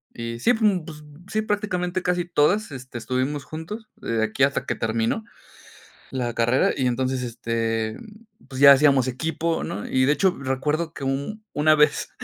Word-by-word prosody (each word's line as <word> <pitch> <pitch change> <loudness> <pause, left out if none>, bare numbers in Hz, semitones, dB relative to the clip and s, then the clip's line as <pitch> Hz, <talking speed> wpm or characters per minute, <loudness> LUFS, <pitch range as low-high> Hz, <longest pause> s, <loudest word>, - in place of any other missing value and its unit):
y 115 0 -5
sí, 245 - +3
pues 220 - -4
n 180 -4 -3
pues 150 -2 -10 0.3
sí, 215 - 0
prácticamente 185 -4 -2
casi 180 -1 0
todas, 175 +4 +2
este, 130 -2 -8
estuvimos 130 +5 -2
juntos 210 +8 -7
de 115 -1 -2
aquí 110 +5 0
hasta 140 +1 +1
que - - -2
terminó 115 - -1 0.9
la 125 -3 -2
carrera 120 +3 +2
y 130 - 0
entonces, 130 +1 0
este, 115 -2 -2 0.5
pues 130 0 -6
ya 140 -1 +10
hacíamos 135 -2 +4
equipo, 160 +5 -2
¿no, 105 - -5
y 130 0 +2
de 145 - +4
hecho, 185 +3 +2
recuerdo 150 +5 -1
que 140 - -6
u 140 +11 -3
una 155 +1 +4
vez 150 -1 +2
140 Hz, 170 wpm, -24 LUFS, 125-170 Hz, 0.9 s, ya